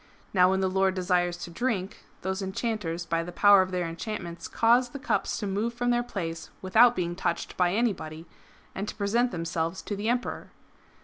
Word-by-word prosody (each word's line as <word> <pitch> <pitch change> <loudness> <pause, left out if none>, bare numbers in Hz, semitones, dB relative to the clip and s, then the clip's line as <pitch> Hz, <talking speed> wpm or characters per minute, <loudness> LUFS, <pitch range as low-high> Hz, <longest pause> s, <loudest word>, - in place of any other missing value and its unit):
Now 180 -2 +5
when 190 0 +1
the 190 - +2
Lord 190 0 +2
desires 180 -1 +1
to 170 - -7
drink, 200 -1 -2 0.2
these 190 +1 -2
enchanters 190 -4 -3
by 165 0 0
the 175 - -7
power 200 +2 +6
of 185 - -1
their 180 -2 -1
enchantments 170 0 -5
cause 240 +2 +3
the 280 - -7
cups 280 - -1
to 210 - -3
move 210 +4 -1
from 245 0 +1
their 240 0 +2
place 165 -9 -5
without 235 +6 +5
being 175 -1 -2
touched 170 -1 -2
by 180 -1 +2
any 230 -1 +2
body, 160 -1 -8 0.5
and 200 +2 -4
to - - -5
present 225 +4 +1
themselves 165 -1 -3
to 205 - -3
the 205 +3 -2
Emperor 245 +1 -2
190 Hz, 195 wpm, -27 LUFS, 175-220 Hz, 0.5 s, power